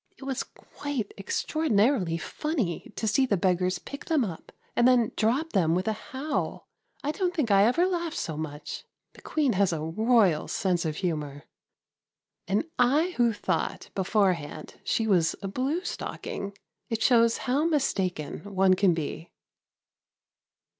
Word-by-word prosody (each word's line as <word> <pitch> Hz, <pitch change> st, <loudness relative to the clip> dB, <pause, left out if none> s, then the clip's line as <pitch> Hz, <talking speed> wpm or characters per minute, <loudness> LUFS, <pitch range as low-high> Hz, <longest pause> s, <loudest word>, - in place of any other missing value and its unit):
It -, -, -12 dB
was 265 Hz, -1 st, -2 dB
quite 280 Hz, -8 st, -6 dB
extraordinarily 210 Hz, -, +1 dB
funny 255 Hz, -, -3 dB
to 220 Hz, -, -2 dB
see 260 Hz, +5 st, +3 dB
the 200 Hz, -, +2 dB
beggars 180 Hz, 0 st, +1 dB
pick 280 Hz, +9 st, -9 dB
them 310 Hz, -7 st, +2 dB
up 170 Hz, -5 st, -8 dB, 0.2 s
and 240 Hz, -, +5 dB
then 245 Hz, -3 st, +4 dB
drop 265 Hz, +9 st, +1 dB
them 165 Hz, -3 st, +3 dB
with 185 Hz, +4 st, -1 dB
a 220 Hz, -, +2 dB
howl! 280 Hz, +6 st, -4 dB, 0.4 s
I 290 Hz, -, 0 dB
don't 360 Hz, +1 st, -1 dB
think 275 Hz, -10 st, 0 dB
I 200 Hz, 0 st, +6 dB
ever 335 Hz, +9 st, +3 dB
laughed 345 Hz, -3 st, -2 dB
so 160 Hz, -, -3 dB
much! 150 Hz, -1 st, -6 dB, 0.3 s
The -, -, -16 dB
Queen 290 Hz, -6 st, +1 dB
has 195 Hz, -1 st, +2 dB
a 165 Hz, -, -2 dB
royal 200 Hz, -1 st, +3 dB
sense 180 Hz, -3 st, 0 dB
of 155 Hz, -1 st, -1 dB
humour. 150 Hz, -5 st, -3 dB, 1.0 s
And 200 Hz, +10 st, +1 dB
I 290 Hz, +9 st, +3 dB
who 240 Hz, -1 st, +4 dB
thought 205 Hz, -, -2 dB
beforehand 185 Hz, -6 st, -1 dB
she 225 Hz, -, 0 dB
was 175 Hz, -7 st, +3 dB
a -, -, -2 dB
blue 265 Hz, -, -1 dB
stocking! 200 Hz, 0 st, -5 dB, 0.3 s
It 225 Hz, -1 st, -1 dB
shows 230 Hz, -2 st, +5 dB
how 275 Hz, +5 st, +2 dB
mistaken 195 Hz, -, -1 dB
one 190 Hz, 0 st, +5 dB
can 185 Hz, -2 st, +3 dB
be. 160 Hz, +1 st, -5 dB
215 Hz, 150 wpm, -27 LUFS, 180-270 Hz, 1.0 s, I